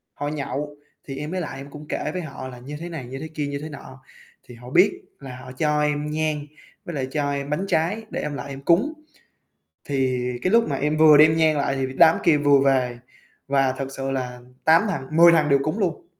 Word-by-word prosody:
Họ 145 - -4
nhậu, 145 0 -4 0.3
thì 135 - -6
em 150 +3 -5
mới 185 0 -2
lại 140 -4 -6
em 140 +1 -9
cũng 150 +1 -10
kể 150 - -3
với 185 - -3
họ 135 -4 -7
là 125 -1 -10
như 140 +4 -8
thế 170 +1 -6
này, 160 -7 -6
như 130 +2 -7
thế 160 - -6
kia, 155 -2 -4
như 140 0 -4
thế 155 - -6
nọ, 135 -2 -11 0.4
thì 120 - -13
họ 120 +1 -12
biết 185 +9 +3 0.2
là 130 -3 -9
họ 130 0 -10
cho 150 +3 0
em 150 0 0
nhang 155 -1 -1 0.4
với 170 - -6
lại 130 -2 -2
cho 145 -1 -1
em 140 0 -3
bánh 150 +6 -1
trái 190 +8 0
để - - -4
em 150 - -4
lại 140 0 -6
em 135 0 -7
cúng. 175 - +2 0.9
Thì 130 -3 -1
cái 185 - 0
lúc 230 -3 +4
mà 140 - -1
em 150 +3 -1
vừa 155 -1 +7
đem 155 +2 +6
nhang 160 -2 +3
lại 140 -1 0
thì 135 0 -1
đám 165 -1 +6
kia 160 -3 +5
vừa 145 -1 +4
về 125 -3 +1 0.5
và 135 -1 +2
thật 135 - -3
sự 135 0 -3
là 125 -2 -4 0.2
8 160 +2 +6
thằng 135 -8 -4
10 170 +1 +9
thằng 155 -3 +3
đều 140 -1 +4
cúng 155 +9 -2
luôn. 190 - -2
145 Hz, 240 wpm, -23 LUFS, 135-160 Hz, 0.9 s, 10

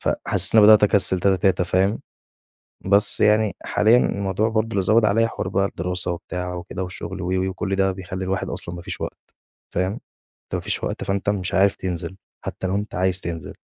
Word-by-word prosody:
فحسّيت 95 +2 +1
إنّي 110 -2 +7
بدأت 110 -1 +7
أكسل 95 -3 +4
تاتا 95 0 +2
تاتا 90 0 +1
فاهم، 95 +4 0 0.9
بس 100 +2 +4
يعني 105 0 +3
حاليًا 110 +3 +3
الموضوع 100 -1 0
برضه 110 0 0
اللي 100 - 0
زوّد 110 +3 +3
عليَّ 115 +3 +2
حوار 95 - -5
بقى 95 +1 0
الدراسة 90 -1 -1
وبتاع 90 +1 -5
وكده 90 +1 -6
والشغل 95 +1 -6
وِ، - - -4
وِ، 95 0 0
وكل 95 +1 -3
ده 95 0 +1
بيخلّي 95 0 -6
الواحد 95 0 -2
أصلًا 85 - -4
ما 85 - -8
فيش 95 0 -6
وقت، - - -8 0.4
فاهم، 90 +2 0
أنت - - -12
ما - - -1
فيش - - -3
وقت - - -3
فأنت 100 +1 -2
مش 95 -3 -2
عارف 100 +1 +3
تنزل، 90 0 -5 0.3
حتى 95 - -4
لو 95 - -1
أنت 105 +2 -4
عايز 95 0 +1
تنزل، 85 -3 -6
95 Hz, 195 wpm, -22 LUFS, 90-100 Hz, 0.9 s, إنّي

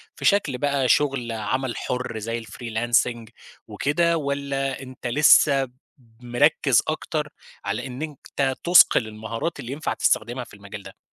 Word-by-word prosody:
في - - -7
شكل 180 -10 +2
بقى 140 -1 0
شغل 135 -5 +1
عمل 120 +4 -2
حُر 125 -3 -3
زي 115 +2 -4
الfreelancing 115 +1 -1 0.4
وكده، 170 +4 +1
والّا 140 -2 -2
أنت 130 -1 -8
لسه 140 +1 +5 0.6
مركّز 125 +1 +3
أكتر 155 -1 -2 0.4
على 105 +6 -3
إن 125 +2 -8
أنت 140 -3 -3
تُصقل 175 -9 +6
المهارات 110 +8 -5
اللي 120 - -6
ينفع 150 +3 -3
تستخدمها 120 +3 0
في - - -16
المجال 100 0 -10
ده؟ 95 - -12
130 Hz, 135 wpm, -23 LUFS, 115-145 Hz, 0.6 s, تُصقل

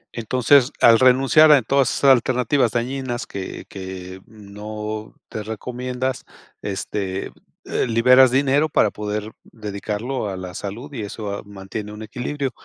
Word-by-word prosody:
Entonces, 125 +3 +3
al 115 -1 +7
renunciar 135 +5 +6
a 145 - +8
todas 135 +2 +2
esas 140 - +4
alternativas 125 0 +2
dañinas 120 0 -3
que 95 -1 -7
que, 95 -1 -8
mm, 105 -2 -15
no 105 +1 -6
te 110 - -6
recomiendas, 125 +4 -4 0.4
este, 95 -1 -4 0.3
eh, - - -1
liberas 125 +3 +6
dinero 140 +4 +2
para 105 -7 +3
poder 105 +1 -4
dedicarlo 105 +2 -4
a 95 - -5
la 90 -1 -7
salud, 115 +11 -7
y 120 - -4
eso 105 0 -5
a - - -6
mantiene 100 +1 -7
un 105 +1 -8
equilibrio. 130 +4 -4
115 Hz, 140 wpm, -21 LUFS, 105-130 Hz, 0.4 s, a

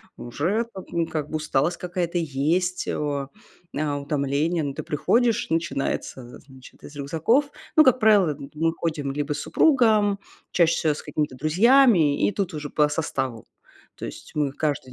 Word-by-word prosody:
уже 175 - -2
как, 190 - -8
м, 165 -1 0
как 150 -2 -4
бы 155 - -2
усталость 155 +2 0
какая-то 175 -1 -3
есть, 165 +4 -1
о, 140 -2 -2 0.5
а, 145 -1 -1
утомление. 145 +3 -1
Но 140 -1 -3
ты - - -6
приходишь, 225 - +1
начинается, 160 -5 -2
э, 120 0 -12
значит, 130 -1 -16
из 145 - -11
рюкзаков 165 - +1 0.3
Ну, 310 - +8
как 255 -2 +4
правило, 210 -6 +5
это 140 0 -8
мы 165 +2 +1
ходим 155 -5 -3
либо 145 +1 -2
с 145 - -5
супругом, 215 - +3 0.3
чаще 170 -2 +3
всего 155 -2 +1
с - - -8
какими-то 150 -4 -3
друзьями, 175 - +4
и - - 0
тут 195 -4 -3
уже 150 -1 -5
по 150 -1 +2
составу. 135 -6 -3 0.5
То - - -7
есть - - -10
мы 145 -2 0
каждый 145 -4 -2
155 Hz, 170 wpm, -24 LUFS, 145-180 Hz, 0.5 s, Ну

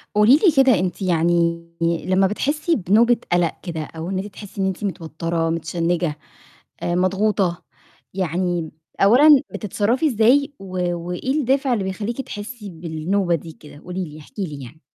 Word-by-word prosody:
قولي 210 +5 +7
لي 360 +1 +4
كده، 255 -7 +4
أنتِ 180 +2 -3
يعني 170 -1 +2 0.2
لمّا 185 +3 +2
بتحسي 300 - 0
بنُوبة 230 +5 +3
قَلَق 175 -2 +2
كده، 165 -4 -4
أو 160 +2 -7
إن 190 - -2
أنتِ 190 - -4
تحسي 200 -1 -8
إن 190 - +2
أنتِ 190 +1 -4
متوترة، 165 -2 -2
متشنجة، 165 0 -1 0.7
مضغوطة، 185 +1 +1 0.5
يعني 175 -2 -1 0.3
أولًا 270 +7 +7
بتتصرَّفي 220 - 0
إزاي، 275 +4 +3
و 185 -2 -2
وإيه 180 +8 -4
الدافع 270 -1 +1
اللي 210 -5 0
بيخليكِ 205 +7 -3
تحسي 210 -2 -8
بالنوبة 170 +2 -1
دي 165 +1 -8
كده؟ 150 -1 -15
قولي 180 +3 -5
لي، 155 -1 -11
احكي 195 +7 -7
لي 145 -5 -8
يعني. 150 +6 -13
185 Hz, 150 wpm, -21 LUFS, 170-215 Hz, 0.7 s, قولي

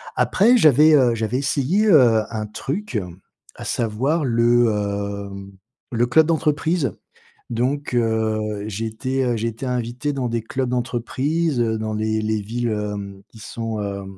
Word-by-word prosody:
Après, 235 +6 +4
j'avais, 155 - +6
heu, 125 -4 +4
j'avais 110 +2 -1
essayé, 145 +10 +1
heu, 120 - +5
un 110 -1 -3
truc, 140 - -4 0.6
à - - -9
savoir 130 +8 0
le, 120 0 +3
hem, 100 -1 -4 0.4
le 120 0 +2
club 160 +5 +4
d'entreprise, 155 - 0 0.6
donc, 130 +4 -1
heu, 110 -2 0
j'ai 110 +2 -4
été 130 +2 -1
j'ai 115 +2 -1
été 115 +4 -7
invité 125 +4 -2
dans 130 -3 -2
des 115 -1 -2
clubs 130 +2 -2
d'entreprise, 130 +5 -1
heu, 110 -1 0
dans 110 0 -3
les 110 0 -1
les, 110 -1 -1
villes, 120 +3 -3
hem, 100 -2 -5
qui 110 - -16
sont, 115 0 -5
heu, 100 -1 -4
120 Hz, 150 wpm, -21 LUFS, 110-135 Hz, 0.6 s, j'avais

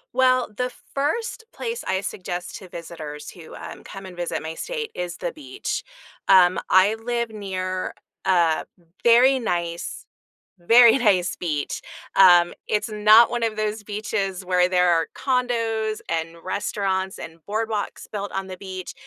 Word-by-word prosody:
Well, 255 -1 +4
the 250 +2 -2 0.2
first 445 - -1
place 465 0 -4
I 190 0 0
suggest 180 -2 -5
to 190 - -12
visitors 160 -3 -8
who, 165 -3 -12
um, - - -9
come 195 0 -9
and 185 - -10
visit 175 -2 -3
my 160 0 -4
state 455 - -5
is 175 -1 -4
the 175 - -3
beach. 135 -4 -5 0.4
Um, 185 -2 +6
I 190 +3 +5
live 235 -1 -1
near 185 -3 -4 0.3
a 170 -4 +3 0.4
very 250 +3 +6
nice, 170 -6 -3 0.5
very 230 +7 +7
nice 185 -7 +2
beach. 150 -5 -3 0.3
Um, 175 -2 +7
it's 210 +2 0
not 215 +2 +6
one 240 -1 -1
of 220 -1 -1
those 215 0 -2
beaches 205 -3 -3
where 180 0 +3
there 180 -1 +3
are 165 -1 +2
condos 230 -4 0
and 165 0 -3
restaurants 190 0 -2
and 165 0 -9
boardwalks 215 -1 -2
built 205 -1 -4
on 195 0 -3
the 185 - -7
beach. 185 -1 -7
195 Hz, 150 wpm, -23 LUFS, 175-225 Hz, 0.5 s, very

